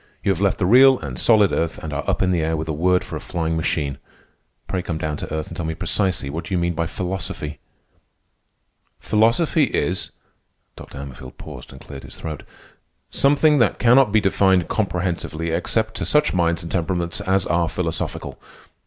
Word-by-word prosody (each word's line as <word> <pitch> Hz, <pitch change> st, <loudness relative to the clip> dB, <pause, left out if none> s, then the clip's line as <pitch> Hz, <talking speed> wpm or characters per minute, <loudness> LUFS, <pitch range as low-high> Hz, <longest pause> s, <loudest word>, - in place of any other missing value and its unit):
"You 100 Hz, -, +2 dB
have 95 Hz, -1 st, -2 dB
left 100 Hz, -2 st, +2 dB
the 95 Hz, -, 0 dB
real 130 Hz, +6 st, +7 dB
and 65 Hz, -, -6 dB
solid 105 Hz, -4 st, +4 dB
earth 85 Hz, 0 st, -1 dB
and 80 Hz, -2 st, -6 dB
are 70 Hz, -, -2 dB
up -, -, +1 dB
in 90 Hz, -, +2 dB
the 85 Hz, -2 st, +1 dB
air 80 Hz, +1 st, 0 dB
with 80 Hz, +1 st, -4 dB
a 80 Hz, -, -2 dB
word 90 Hz, +4 st, +2 dB
for -, -, -7 dB
a -, -, -4 dB
flying 80 Hz, -1 st, -2 dB
machine. 75 Hz, -3 st, -1 dB, 0.7 s
Pray 95 Hz, -, -2 dB
come 85 Hz, -2 st, -4 dB
down 75 Hz, -1 st, -2 dB
to -, -, -7 dB
earth 80 Hz, 0 st, -3 dB
and -, -, -8 dB
tell 85 Hz, -, -4 dB
me 80 Hz, 0 st, -3 dB
precisely 90 Hz, -5 st, -1 dB
what 80 Hz, +5 st, -5 dB
you 95 Hz, -, 0 dB
do -, -, 0 dB
mean 85 Hz, 0 st, 0 dB
by 85 Hz, -1 st, -1 dB
philosophy." 90 Hz, -4 st, -5 dB, 1.4 s
"Philosophy 125 Hz, +8 st, +2 dB
is—" 95 Hz, -6 st, -1 dB, 0.7 s
(Dr. -, -, -11 dB
Hammerfield 70 Hz, -2 st, -9 dB
paused -, -, -10 dB
and 65 Hz, -, -12 dB
cleared 70 Hz, -1 st, -10 dB
his -, -, -11 dB
throat)—"something 140 Hz, -, -1 dB
that 115 Hz, -, +2 dB
cannot 125 Hz, -1 st, +5 dB
be 110 Hz, -, +4 dB
defined 95 Hz, -3 st, +2 dB
comprehensively 90 Hz, -5 st, -2 dB
except 110 Hz, +6 st, 0 dB
to -, -, -2 dB
such 150 Hz, 0 st, +2 dB
minds 85 Hz, -2 st, +1 dB
and 85 Hz, -, -7 dB
temperaments 85 Hz, -1 st, -1 dB
as 95 Hz, -1 st, +1 dB
are 85 Hz, +1 st, +1 dB
philosophical. 80 Hz, -3 st, -4 dB
85 Hz, 190 wpm, -22 LUFS, 80-100 Hz, 1.4 s, real